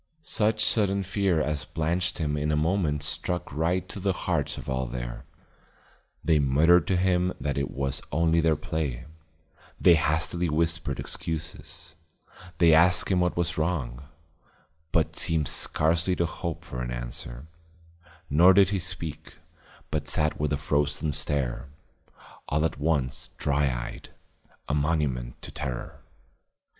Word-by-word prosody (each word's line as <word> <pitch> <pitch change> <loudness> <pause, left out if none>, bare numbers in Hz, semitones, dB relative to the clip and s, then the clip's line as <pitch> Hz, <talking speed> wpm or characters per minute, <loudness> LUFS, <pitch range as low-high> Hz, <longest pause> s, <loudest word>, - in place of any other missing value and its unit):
Such 110 -5 +2
sudden 100 -3 +3
fear 95 -3 +1
as 75 -1 -1
blanched 85 +2 -1
him 75 -3 -1
in 75 +1 -1
a - - +2
moment 75 -2 0
struck 90 +1 -3
right 85 +5 0
to 100 - -7
the 95 0 0
hearts 85 -5 -2
of - - -8
all 65 -1 -1
there. - - -6 1.0
They 80 -2 +4
muttered 75 +5 +4
to 95 - +2
him 90 0 +2
that 70 0 -2
it 70 -1 -1
was 70 -1 -2
only 80 +2 +2
their 80 -1 +3
play, 75 -5 -3 0.7
they 85 - +7
hastily 80 +2 +1
whispered 80 -2 0
excuses, 85 +1 -5 0.6
they 85 -2 +6
asked 85 +3 +4
him 90 - +3
what 90 -1 0
was 85 -2 -1
wrong, 70 -6 -2 0.9
but 80 -2 +1
seemed 80 -3 +4
scarcely 85 +4 +2
to 85 - +1
hope 85 0 -5
for 60 - -6
an 60 - -3
answer, - - -6 0.8
nor 85 +6 +6
did 100 -1 +6
he 100 -1 0
speak, 85 -3 -6 0.6
but 75 -1 -2
sat 75 0 0
with 75 -1 0
a 75 - +1
frozen 75 +2 0
stare, 70 -3 0 0.8
all 75 +2 +1
at 80 - -2
once 70 -4 -1
dry 70 0 +1
eyed, - - -4 0.6
a - - -1
monument 70 -5 -1
to - - -8
terror. 60 -2 -6
80 Hz, 145 wpm, -27 LUFS, 70-85 Hz, 1.0 s, they